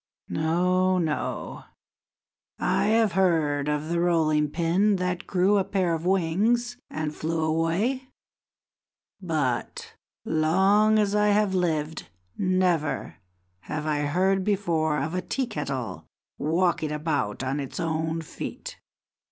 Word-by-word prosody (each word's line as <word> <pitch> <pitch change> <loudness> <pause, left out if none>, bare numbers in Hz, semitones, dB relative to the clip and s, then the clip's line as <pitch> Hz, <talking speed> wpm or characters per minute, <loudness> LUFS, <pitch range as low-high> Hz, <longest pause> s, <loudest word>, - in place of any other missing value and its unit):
No, 180 +3 +2
no, 160 -4 -3 0.9
I - - +1
have 220 0 +3
heard 160 -6 +1
of 150 +1 -2
the 170 0 0
rolling 155 -3 +2
pin 175 +6 +2
that 180 -1 -2
grew 195 +2 +3
a - - +2
pair 185 -3 0
of 165 +2 -3
wings 205 +7 +1
and 155 -1 -3
flew 160 0 -2
away, 170 +12 0 1.1
but, 155 -9 -2 0.3
long 190 +7 +3
as 205 -1 +2
I 210 0 +3
have 205 -1 +2
lived, 160 -4 -1 0.3
never 185 -5 0 0.5
have 150 0 -4
I 150 -1 0
heard 185 +6 +1
before 170 -7 0
of 155 +4 -2
a 185 - -1
tea 265 +7 -2
kettle 140 - -5 0.3
walking 165 0 +1
about 150 -8 -2
on 135 +2 -1
its 135 -2 -5
own 160 0 -1
feet. 160 - -7
170 Hz, 120 wpm, -26 LUFS, 155-190 Hz, 1.1 s, have